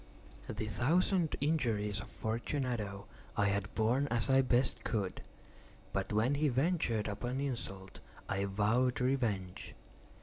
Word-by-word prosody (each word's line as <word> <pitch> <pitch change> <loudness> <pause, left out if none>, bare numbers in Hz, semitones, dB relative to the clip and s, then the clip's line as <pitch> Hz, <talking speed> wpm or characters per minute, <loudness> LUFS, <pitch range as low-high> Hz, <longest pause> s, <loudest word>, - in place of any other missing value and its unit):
The 110 - -3
thousand 165 - +2
injuries 115 -10 +1
of - - -9
Fortunato 110 -3 -2 0.3
I 105 - +3
had 100 -1 0
borne 120 +6 +2
as 120 +1 +1
I 135 0 +6
best 125 0 +2
could; 100 -5 -2 0.7
but - - -1
when 110 +6 +2
he 150 +2 +2
ventured 130 - +1
upon 120 +5 -3
insult, 115 -8 -4 0.3
I 100 +1 0
vowed 110 +6 +2
revenge. 115 -8 -1
120 Hz, 125 wpm, -34 LUFS, 105-135 Hz, 0.7 s, I